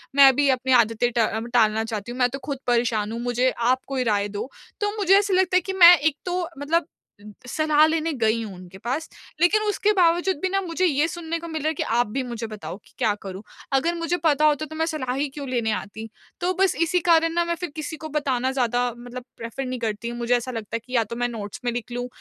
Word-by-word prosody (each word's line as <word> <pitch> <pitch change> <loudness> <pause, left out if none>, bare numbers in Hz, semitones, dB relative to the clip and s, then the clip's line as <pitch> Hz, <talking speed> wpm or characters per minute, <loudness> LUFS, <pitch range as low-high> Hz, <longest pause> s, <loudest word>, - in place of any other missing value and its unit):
मैं 275 -2 +8
भी 285 +1 +3
अपनी 260 0 +1
आदतें 230 +2 -1
टा 230 -1 +2 0.3
टालना 220 -2 +3
चाहती 225 0 -5
हूँ। 250 - -7
मैं 250 -1 +3
तो 275 +3 -6
खुद 280 -2 -4
परेशान 235 -3 +1
हूँ, 230 - -4
मुझे 245 +1 +1
आप 250 +2 +2
कोई 270 -2 -1
राय 205 0 0
दो। 250 - -4 0.3
तो 415 +1 -1
मुझे 390 -1 +5
ऐसा 405 -1 -1
लगता 370 0 +3
है - - +3
कि 380 +3 -5
मैं 345 +1 +11
एक 295 0 0
तो 360 0 -1 0.2
मतलब 310 +3 0 0.6
सलाह 305 +3 +3
लेने 325 0 0
गई 230 -3 +1
हूँ 215 -3 -6
उनके 180 +1 -12
पास 255 +10 -3 0.3
लेकिन 400 +5 +4
उसके 415 +1 +1
बावजूद 350 0 +3
भी 375 - 0
ना 390 +1 +1
मुझे 360 0 -1
ये 300 -2 +2
सुनने 335 0 -4
को 335 - -8
मिल 320 -2 -4
रहा 305 - -1
है - - -1
कि - - -1
आप 240 +1 +1
भी 265 +6 -2
मुझे 235 -2 -5
बताओ 210 -4 -7
कि - - -23
क्या 225 -5 +2
करूँ? 190 0 -7 0.3
अगर 330 +6 +2
मुझे 335 +1 -1
पता 305 -1 +3
होता 300 0 +2
तो 315 - -10
मैं 320 +1 0
सलाह 300 -6 -3
ही 285 +2 0
क्यों 280 0 -7
लेने 235 -3 0
आती? 220 +2 -5 0.3
तो 360 +1 +1
बस 385 -1 +3
इसी 335 +2 +2
कारण 330 -1 +3
ना 345 0 +2
मैं 340 0 -1
फिर 350 +1 -5
किसी 315 0 -5
को 315 0 -8
बताना 265 -4 0
ज़्यादा 245 -2 +1
मतलब 245 +1 -8
प्रेफर 230 +4 -5
नहीं 255 -1 -4
करती 225 0 -3
हूँ। 240 - -6
मुझे 240 +1 +1
ऐसा 245 +2 -5
लगता 225 -2 -5
है - - -1
कि 255 - -12
या 230 - +4
तो 225 +2 -7
मैं 245 +1 0
नोट्स 210 -4 -7
में 240 - +1
लिख 240 0 -5
लूँ 245 +1 -3
265 Hz, 250 wpm, -24 LUFS, 235-330 Hz, 0.6 s, मैं